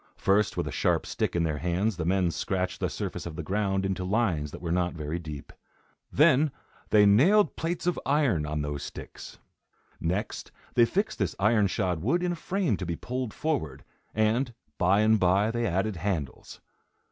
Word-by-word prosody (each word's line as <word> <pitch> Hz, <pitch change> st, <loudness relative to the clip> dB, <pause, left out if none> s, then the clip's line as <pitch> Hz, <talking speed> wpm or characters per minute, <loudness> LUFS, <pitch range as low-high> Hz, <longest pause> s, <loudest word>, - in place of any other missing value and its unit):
First, 100 Hz, +2 st, +2 dB
with -, -, -1 dB
a -, -, -3 dB
sharp -, -, +1 dB
stick -, -, -2 dB
in 85 Hz, -, +2 dB
their 75 Hz, -3 st, -1 dB
hands, 90 Hz, +6 st, 0 dB
the 85 Hz, -2 st, -3 dB
men 90 Hz, -1 st, +2 dB
scratched 90 Hz, +1 st, -2 dB
the -, -, -1 dB
surface -, -, -5 dB
of 80 Hz, -, -7 dB
the 85 Hz, -, -5 dB
ground 95 Hz, +1 st, 0 dB
into 95 Hz, -1 st, -2 dB
lines 90 Hz, -7 st, 0 dB
that -, -, -9 dB
were 85 Hz, -1 st, -4 dB
not 90 Hz, 0 st, 0 dB
very 80 Hz, +2 st, -4 dB
deep. 75 Hz, -4 st, -8 dB, 0.6 s
Then 150 Hz, 0 st, +4 dB, 0.4 s
they 105 Hz, -1 st, +6 dB
nailed 160 Hz, -, +5 dB
plates 170 Hz, +2 st, -3 dB
of 180 Hz, -, 0 dB
iron 135 Hz, -, +2 dB
on 75 Hz, 0 st, -2 dB
those 75 Hz, -1 st, -4 dB
sticks. -, -, -9 dB, 0.6 s
Next, 95 Hz, +6 st, -3 dB, 0.2 s
they 120 Hz, -, +5 dB
fixed 200 Hz, -, -1 dB
this -, -, -1 dB
iron 105 Hz, 0 st, +3 dB
shod 90 Hz, -5 st, -1 dB
wood 170 Hz, -, +1 dB
in 180 Hz, -, +1 dB
a -, -, -2 dB
frame 175 Hz, -, -1 dB
to 90 Hz, -, -5 dB
be 85 Hz, -, -2 dB
pulled 125 Hz, +3 st, -4 dB
forward, 115 Hz, -, -3 dB, 0.3 s
and, 115 Hz, +3 st, +1 dB, 0.2 s
by 95 Hz, +4 st, +4 dB
and 110 Hz, 0 st, +4 dB
by, 95 Hz, +4 st, +3 dB
they 120 Hz, 0 st, -1 dB
added 95 Hz, +2 st, -1 dB
handles. 85 Hz, -6 st, -4 dB
100 Hz, 185 wpm, -27 LUFS, 85-120 Hz, 0.6 s, they